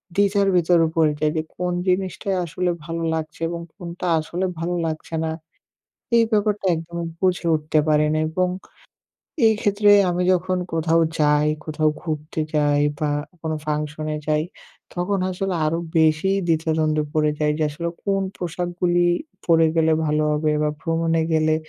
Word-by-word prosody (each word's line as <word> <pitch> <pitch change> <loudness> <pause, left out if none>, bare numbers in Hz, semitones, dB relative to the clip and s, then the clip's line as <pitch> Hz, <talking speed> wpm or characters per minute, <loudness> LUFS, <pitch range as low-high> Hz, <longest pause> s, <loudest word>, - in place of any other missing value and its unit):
দ্বিধার 200 0 +3
ভিতরে 170 -1 +4
পড়ে 160 -2 +4
যাই 150 0 +1
যে - - +2
কোন 180 0 -2
জিনিসটাই 190 +1 0
আসলে 180 +2 -2 0.2
ভালো 165 0 -4
লাগছে 155 0 -6
এবং 170 0 -4
কোনটা 175 -1 -7
আসলে 170 +4 -3
ভালো 175 +2 -2
লাগছে 160 +1 -5
না। 160 - -1 0.9
এই 230 - +6
ব্যাপারটা 210 -1 +1
একদমই 170 +1 -5
বুঝে 180 -2 +1
উঠতে 155 0 0
পারি 150 0 +4
না 155 - +1
এবং 180 +3 0 1.0
এক্ষেত্রে 210 -1 +2 0.2
আমি 175 +1 0
যখন 185 0 0
কোথাও 165 0 +2 0.2
যাই, 150 0 +3 0.2
কোথাও 155 0 0
ঘুরতে 155 -1 -4
যাই 145 -1 +3 0.2
বা 150 -1 0 0.3
কোনো 160 -1 -2
ফাংশনে 150 0 -2
যাই 155 0 +2 0.5
তখন 185 +3 -1
আসলে 185 0 -2
আরো 160 +2 0 0.2
বেশি 160 +4 +3 0.2
দ্বিধাদ্বন্দ্বে 155 -1 +1
পড়ে 150 -1 +2
যাই 150 0 +2
যে 155 - 0
আসলে 170 +3 -4 0.2
কোন 195 -1 +1 0.2
পোশাকগুলি 175 0 -1 0.5
পড়ে 165 -1 +5
গেলে 160 0 +3
ভালো 150 0 +1
হবে 150 +1 +1
বা 150 - +2
ভ্রমণে 165 0 0
গেলে 155 0 +3
165 Hz, 150 wpm, -22 LUFS, 155-180 Hz, 1.0 s, এই